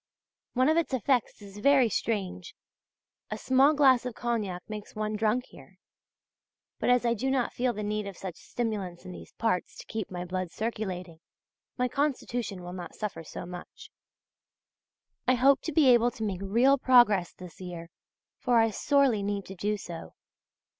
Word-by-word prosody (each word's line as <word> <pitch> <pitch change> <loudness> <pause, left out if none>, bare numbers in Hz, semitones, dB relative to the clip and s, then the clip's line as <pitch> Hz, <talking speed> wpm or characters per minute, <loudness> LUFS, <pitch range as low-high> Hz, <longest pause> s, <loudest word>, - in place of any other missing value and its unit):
One 255 +1 +3
of 315 +1 +3
its 330 -5 +1
effects 245 -3 0
is 200 0 -11
very 270 +1 +5
strange; 195 -4 -3 0.7
a - - -3
small 270 +4 +4
glass 265 -4 +5
of 250 -3 -5
cognac 210 -7 -2
makes 210 -1 -8
one 215 0 -2
drunk 220 +4 +1
here. - - -16 1.0
But - - 0
as 245 -1 +4
I 235 - +3
do 255 +4 -2
not 265 -2 0
feel 250 0 +1
the 210 -2 -5
need 210 0 -2
of 195 -3 -8
such 185 -3 -7
stimulants 200 -7 -4
in 185 - -7
these - - -11
parts 225 -6 -1
to - - -10
keep 220 -3 -4
my 180 -1 -5
blood 185 0 -3
circulating, 185 -5 -4 0.6
my 250 -1 +1
constitution 245 -8 -2
will 175 0 -7
not 175 -2 -8
suffer 195 -6 -5
so 160 - -7
much. 175 0 -10 1.4
I 255 - +5
hope 270 +3 +4
to 320 - -2
be 295 -2 +4
able 240 -1 +5
to 220 - -4
make 195 -3 -2
real 240 +8 +3
progress 240 -9 +5
this 180 0 -12
year; 175 -2 -7 0.5
for 245 -3 +2
I 225 -1 +4
sorely 270 -1 +2
need 200 -1 -2
to 195 - -9
do 210 +3 -1
so. 170 -4 -8
215 Hz, 175 wpm, -28 LUFS, 185-250 Hz, 1.4 s, very